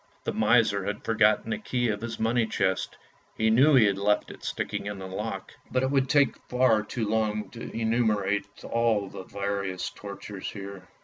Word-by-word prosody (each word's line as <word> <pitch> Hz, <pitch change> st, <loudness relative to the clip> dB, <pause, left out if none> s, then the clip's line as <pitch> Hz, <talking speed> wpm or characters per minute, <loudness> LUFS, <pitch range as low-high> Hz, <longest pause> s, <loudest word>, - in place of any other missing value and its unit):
The -, -, -2 dB
miser -, -, +3 dB
had -, -, -3 dB
forgotten 110 Hz, -, +3 dB
the 220 Hz, -, -1 dB
key 125 Hz, -, -1 dB
of 105 Hz, -1 st, -2 dB
his 115 Hz, 0 st, -5 dB
money 115 Hz, +1 st, +2 dB
chest, 95 Hz, -3 st, -1 dB, 0.4 s
he 110 Hz, 0 st, +3 dB
knew 135 Hz, +6 st, +6 dB
he 120 Hz, -4 st, +7 dB
had 100 Hz, -1 st, +1 dB
left 105 Hz, +1 st, +1 dB
it -, -, -13 dB
sticking -, -, -3 dB
in 105 Hz, -1 st, -4 dB
the 95 Hz, -, -7 dB
lock. 95 Hz, 0 st, -5 dB, 0.2 s
But 130 Hz, 0 st, +1 dB
it 130 Hz, -, +1 dB
would 135 Hz, -2 st, +2 dB
take 145 Hz, -2 st, +3 dB
far 125 Hz, -3 st, +4 dB
too 110 Hz, +1 st, -3 dB
long 110 Hz, -1 st, 0 dB
to 115 Hz, -, -7 dB
enumerate 110 Hz, -3 st, +1 dB, 0.2 s
all 115 Hz, -4 st, +1 dB
the -, -, -8 dB
various 100 Hz, -1 st, -3 dB
tortures 100 Hz, -1 st, -7 dB
here. 100 Hz, -2 st, -8 dB
110 Hz, 185 wpm, -27 LUFS, 100-120 Hz, 0.4 s, he